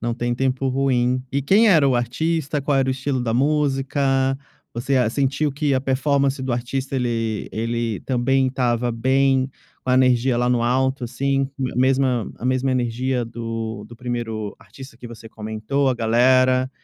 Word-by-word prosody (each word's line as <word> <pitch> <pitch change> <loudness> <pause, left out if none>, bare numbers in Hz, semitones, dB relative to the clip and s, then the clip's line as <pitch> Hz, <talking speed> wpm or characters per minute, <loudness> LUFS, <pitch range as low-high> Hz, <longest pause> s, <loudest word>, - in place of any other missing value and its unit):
Não 120 0 -1
tem 120 0 -2
tempo 130 +1 -1
ruim. 130 -1 +1
E 140 - 0
quem 205 +10 +4
era 155 -7 +5
o 130 - +2
artista? 145 +4 -1
Qual 140 0 0
era 135 -1 +2
o - - +3
estilo 135 0 -2
da 115 - -1
música? 140 +1 0 0.7
Você 130 +3 -1
a 125 -4 +3
sentiu 140 +3 0
que 145 0 -1
a 130 - +2
performance 135 0 0
do 130 -2 -2
artista 130 +3 -3
ele 115 -3 -2
ele 115 -1 -2
também 130 +1 +1
estava 120 -2 0
bem, 130 +2 +2 0.4
com 130 - -1
a - - +4
energia 130 -1 +3
lá 120 +1 +1
no 120 -1 +1
alto, 130 +1 0
assim, 135 +2 -1 0.2
a - - -9
mesma 130 -2 +1
a - - -9
mesma 130 +1 +1
energia 125 0 -1
do 115 -2 -5
do 120 - -12
primeiro 115 -4 -4
artista 125 +5 -13
que 120 - -10
você 115 -1 -11
comentou, 110 +6 -2
a 130 - +1
galera 130 +3 +3
130 Hz, 175 wpm, -21 LUFS, 120-135 Hz, 0.7 s, era